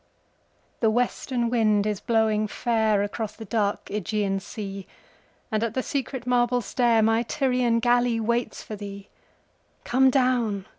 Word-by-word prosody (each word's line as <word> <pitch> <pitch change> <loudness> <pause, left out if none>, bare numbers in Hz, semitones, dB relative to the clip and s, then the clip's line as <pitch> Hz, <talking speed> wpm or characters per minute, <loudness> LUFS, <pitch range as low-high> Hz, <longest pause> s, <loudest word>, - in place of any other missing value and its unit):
THE 225 - +3
WESTERN 240 +1 -1
wind 215 -4 +2
is 210 -2 -1
blowing 220 -2 +1
fairAcross 215 -1 0
the 225 - -8
dark 205 -1 -1
Ægean 205 -1 -2
sea, 200 -2 -7 0.6
And 215 0 0
at 230 -1 -2
the 260 - 0
secret 270 -4 -3
marble 245 0 +2
stairMy 225 +1 +2
Tyrian 250 -4 +1
galley 240 0 +2
waits 235 +2 -1
for 215 - -7
thee. 200 -1 -9 0.7
Come 265 +2 +4
down! 245 -7 +1
225 Hz, 130 wpm, -25 LUFS, 210-245 Hz, 0.7 s, Come